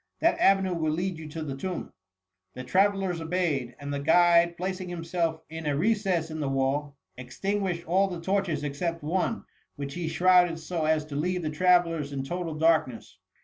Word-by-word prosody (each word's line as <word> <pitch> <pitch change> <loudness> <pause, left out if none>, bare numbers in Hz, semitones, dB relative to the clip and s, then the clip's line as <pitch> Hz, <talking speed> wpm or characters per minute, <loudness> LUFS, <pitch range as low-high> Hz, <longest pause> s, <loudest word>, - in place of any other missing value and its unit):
That 335 - +2
avenue 195 -1 +4
will 160 -2 0
lead 175 0 -2
you 155 -1 -8
to 160 +1 -5
the 140 -3 -4
tomb.'' 180 +5 -5 0.6
The 125 - -6
travellers 190 +2 +1
obeyed; 160 -8 -1
and 145 0 -5
the 140 - -2
guide, 170 +3 +4
plac 185 +1 -3
ing 180 - -6
himself 165 -1 -2
in 160 0 -6
a 145 -1 0
recess 190 -3 +1
in 155 - -5
the 145 -3 -1
wall, 135 +2 -1 0.2
extin 195 +11 -3
guished 175 -3 -3
all 190 +4 +3
the 180 -3 -5
torches 175 -4 -1
except 165 +3 -3
one, 185 +8 -1 0.3
which 140 -1 -6
he 175 0 -3
shrouded 175 +1 +4
so 160 0 -3
as 155 -1 +1
to 150 -2 -8
leave 180 +4 -1
the 155 - -2
travellers 165 -3 +2
in 135 -1 -3
total 170 +2 -4
darkness. 155 - +1
165 Hz, 190 wpm, -27 LUFS, 150-180 Hz, 0.6 s, avenue